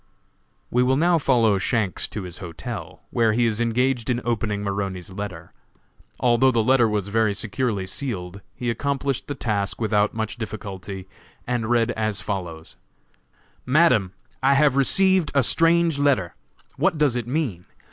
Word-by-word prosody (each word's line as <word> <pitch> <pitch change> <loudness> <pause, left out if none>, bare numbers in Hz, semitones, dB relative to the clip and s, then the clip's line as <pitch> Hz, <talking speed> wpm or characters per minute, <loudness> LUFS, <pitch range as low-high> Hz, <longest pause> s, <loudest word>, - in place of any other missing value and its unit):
We 125 - +3
will 130 +1 +3
now 170 +2 +3
follow 115 -8 +3
Shanks 105 -1 0
to 105 - -6
his 90 -1 -7
hotel, 85 -3 -7
where 115 -2 +2
he 120 +2 +2
is 115 0 0
engaged 120 +1 0
in 120 -1 +1
opening 105 -3 -1
Maroney's 95 -2 -3
letter. 95 -4 -7 0.7
Although 125 +1 +4
the 115 -3 +2
letter 120 -1 +4
was 105 -2 -2
very 110 -1 +1
securely 110 -2 -2
sealed, 95 -4 -5
he 120 -1 -2
accomplished 140 +1 -2
the 145 - -4
task 105 -6 -2
without 105 -2 +1
much 110 +1 -3
difficulty, 100 -4 -7 0.4
and 120 -2 -2
read 120 -1 +2
as 110 -3 -2
follows: 90 -4 -6 0.9
"MADAM: 125 - +3 0.3
I 135 +1 +4
have 145 -1 +4
received 185 +5 +3
a 140 - +4
strange 165 +2 +3
letter. 135 -12 +2 0.4
What 160 - +1
does 145 -5 +2
it 120 -2 -3
mean? 125 - -2
115 Hz, 150 wpm, -23 LUFS, 100-130 Hz, 0.9 s, Although